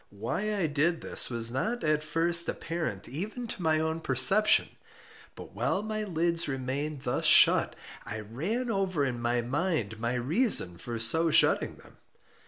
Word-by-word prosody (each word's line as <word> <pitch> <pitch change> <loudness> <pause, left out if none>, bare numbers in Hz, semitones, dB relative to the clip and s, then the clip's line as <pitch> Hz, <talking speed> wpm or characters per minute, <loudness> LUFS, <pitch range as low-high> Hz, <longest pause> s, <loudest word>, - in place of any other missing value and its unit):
Why 155 - -4
I 185 - -1
did 155 +3 -1
this - - +4
was 115 -1 -2
not 220 - -4
at 150 0 -1
first 170 +2 +1
apparent 165 - -6
even 210 - -7
to 225 - -8
my 160 -2 0
own 160 +1 -3
perception. 165 - +4 0.7
But - - -13
while 195 - -2
my 215 0 -5
lids 170 -2 -1
remained 135 +2 -5
thus 125 - -2
shut, - - +5 0.3
I 110 0 -7
ran 185 - -4
over 185 -7 -2
in 120 -3 -5
my 120 +1 -1
mind 130 - -3
my 120 +2 -3
reason 125 - +3
for 120 -1 -7
so 160 +9 +3
shutting - - +2
them. - - -18
155 Hz, 160 wpm, -27 LUFS, 125-185 Hz, 0.7 s, shut